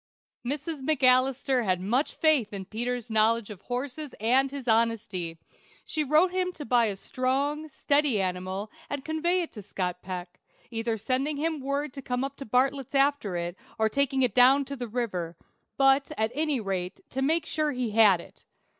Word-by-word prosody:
Mrs. 290 +3 -3
McAlister 260 -2 +3
had 185 -4 +1
much 240 +10 0
faith 290 -10 +2
in 195 -1 -5
Peter's 240 +2 -3
knowledge 220 0 +2
of 200 -2 -10
horses 260 +5 -4
and 255 +5 +3
his 275 -2 -7
honesty. 220 -7 0 0.5
She 310 - -1
wrote 310 +6 +4
him 365 0 0
to 295 - -8
buy 240 0 +4
a 205 -3 -1
strong, 275 +8 -1
steady 285 -5 +2
animal, 185 +2 -3 0.2
and 285 -1 -4
convey 345 +3 +1
it 330 - -8
to 210 - -9
Scott 180 -2 -4
Peck, 180 -1 -7 0.3
either 225 0 -1
sending 270 +7 -1
him 315 +1 -1
word 280 +1 -2
to 275 - -7
come 250 0 -2
up 275 0 -4
to 275 - -7
Bartlett's 265 +3 0
after 275 -9 +2
it, 175 +1 -3 0.2
or 220 0 +2
taking 270 +1 +2
it 245 -5 +2
down 260 +3 +6
the 265 -3 -6
river; 185 -8 -3 0.4
but, 270 +1 +4
at 220 +1 +1
any 300 -1 +1
rate, 190 -4 -4
to 265 - -2
make 320 +5 +2
sure 305 -1 0
he 250 -4 -2
had 210 -4 +6
it. - - -14
255 Hz, 175 wpm, -27 LUFS, 215-280 Hz, 0.5 s, down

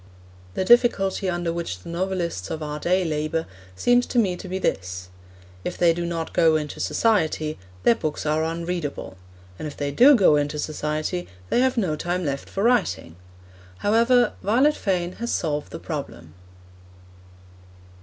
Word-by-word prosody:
The 190 - 0
difficulty 195 -5 +3
under 175 -1 -1
which 165 - -4
the - - -9
novelists 170 - -2
of 155 - -4
our 150 0 -4
day 185 +3 +1
labour 155 +1 -1 0.3
seems 245 - +3
to - - -3
me 195 -6 +3
to 190 - -9
be 185 +1 -3
this: 90 - -3 0.5
if 180 - -4
they 170 -1 +4
do 170 +1 -3
not 165 -1 -4
go 165 -2 +4
into 150 -1 -3
society, 160 -8 +1 0.2
their - - +6
books 155 -10 -4
are 155 +1 +1
unreadable; 165 - -4 0.4
and 155 - -4
if 145 - -9
they 145 -1 -2
do 265 - +7
go 185 -9 +5
into 145 +1 -1
society, 155 +3 -3 0.2
they - - +3
have 260 0 +2
no 180 -9 +1
time 175 +3 -2
left 140 -1 -3
for 195 - -2
writing. 230 - +1 0.7
However, 235 +3 +4
Violet 260 +9 +3
Fane 180 -3 -1
has 235 - -2
solved 150 -3 -2
the - - -5
problem. 135 - -7
170 Hz, 160 wpm, -24 LUFS, 150-195 Hz, 0.7 s, do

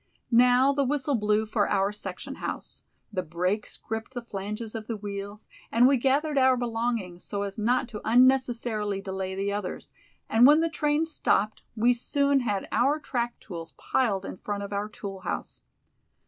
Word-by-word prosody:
Now 250 +3 +5
the 280 0 +1
whistle 285 +1 0
blew 210 -2 +2
for 215 -1 0
our 195 0 +2
section 210 - -6
house; - - -6 0.3
the 185 - 0
brakes 180 +5 -2
gripped 225 +4 -6
the 245 - -4
flanges 210 +1 -5
of 220 -2 -6
the 230 - -3
wheels, 205 0 -7 0.2
and 235 +2 +5
we 275 - +5
gathered 280 +3 +2
our 260 -1 +5
belongings 230 -6 -2
so 200 -1 -3
as 200 +1 -5
not 245 +4 +2
to 210 -3 -7
unnecessarily 240 -4 +2
delay 190 -1 -4
the 200 +1 -1
others, 200 -3 -5 0.4
and 235 +3 +6
when 300 +2 +7
the 330 0 +1
train 300 0 +1
stopped 215 -9 0
we 240 +2 +4
soon 280 +3 +1
had 210 -6 -2
our 275 +5 +3
track 240 -5 -3
tools 165 -6 -8
piled 200 -7 0
in - - -6
front 200 +1 -4
of 200 - -6
our 205 +1 -2
tool 195 -2 -7
house. - - -4
220 Hz, 175 wpm, -27 LUFS, 200-255 Hz, 0.4 s, when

